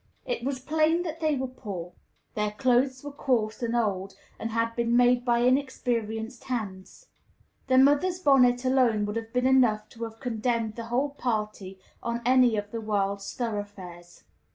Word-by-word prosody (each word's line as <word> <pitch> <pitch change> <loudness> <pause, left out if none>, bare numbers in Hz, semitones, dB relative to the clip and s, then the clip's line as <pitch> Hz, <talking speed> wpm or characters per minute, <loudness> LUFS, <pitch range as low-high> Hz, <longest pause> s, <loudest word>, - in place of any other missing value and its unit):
It - - -3
was 270 +1 -1
plain 315 +5 +1
that 325 -2 -5
they 310 -2 +1
were 265 -1 -2
poor; 200 -9 -7 0.4
their 210 0 0
clothes 255 +2 +1
were 290 - -6
coarse 245 -6 -1
and 235 0 -1
old, 195 -4 -1 0.2
and 225 - -3
had 230 0 -1
been 235 0 +1
made 245 0 +4
by 240 -1 +2
inexperienced 245 -3 -1
hands. 215 - -5 0.6
The 260 -1 +3
mother's 290 +7 +4
bonnet 260 -6 +4
alone 250 -5 +3
would 210 +1 -4
have 225 0 -4
been 250 +1 0
enough 245 -5 +3
to 230 0 -6
have 225 0 -10
condemned 230 -2 -1
the 230 - -6
whole 250 +5 0
party 210 -7 -3 0.2
on 235 0 -3
any 250 -3 +4
of 205 0 -4
the 230 - -4
world's 200 -2 -1
thoroughfares. 205 -7 -6
235 Hz, 165 wpm, -27 LUFS, 215-260 Hz, 0.6 s, made